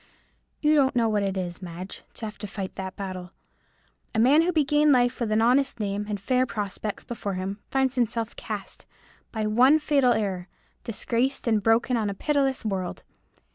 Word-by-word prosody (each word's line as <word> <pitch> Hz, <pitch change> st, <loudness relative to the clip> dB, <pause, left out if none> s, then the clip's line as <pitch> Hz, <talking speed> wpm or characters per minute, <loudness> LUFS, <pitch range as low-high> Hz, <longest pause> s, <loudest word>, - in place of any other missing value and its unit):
You 300 Hz, 0 st, +4 dB
don't 275 Hz, -4 st, +3 dB
know 235 Hz, -2 st, +3 dB
what 210 Hz, -2 st, +1 dB
it 195 Hz, -1 st, -1 dB
is, 180 Hz, 0 st, -4 dB
Madge, 180 Hz, +1 st, -7 dB
to 225 Hz, -, -5 dB
have 215 Hz, -1 st, -8 dB
to 210 Hz, -, -5 dB
fight 195 Hz, -2 st, -5 dB
that 190 Hz, 0 st, -6 dB
battle. 185 Hz, -2 st, -6 dB, 0.8 s
A -, -, +2 dB
man 270 Hz, +7 st, +6 dB
who 350 Hz, +2 st, +2 dB
began 300 Hz, -2 st, +3 dB
life 245 Hz, -1 st, +3 dB
with 230 Hz, -3 st, -1 dB
an 220 Hz, +1 st, +3 dB
honest 265 Hz, +2 st, +2 dB
name, 205 Hz, 0 st, -2 dB
and 205 Hz, -1 st, -2 dB
fair 255 Hz, +5 st, +1 dB
prospects 210 Hz, -1 st, -4 dB
before 205 Hz, -5 st, -4 dB
him, 190 Hz, +2 st, -4 dB
finds 265 Hz, -1 st, +1 dB
himself 235 Hz, -2 st, -1 dB
cast, 210 Hz, -3 st, -6 dB, 0.4 s
by 220 Hz, -2 st, -2 dB
one 250 Hz, +8 st, +5 dB
fatal 285 Hz, -5 st, +3 dB
error, 190 Hz, -4 st, -2 dB, 0.4 s
disgraced 240 Hz, +4 st, -1 dB
and 220 Hz, -2 st, +3 dB
broken, 225 Hz, +3 st, +3 dB
on 215 Hz, -2 st, 0 dB
a 200 Hz, -, -4 dB
pitiless 275 Hz, -1 st, 0 dB
world. 190 Hz, -4 st, -3 dB
220 Hz, 180 wpm, -26 LUFS, 200-260 Hz, 0.8 s, man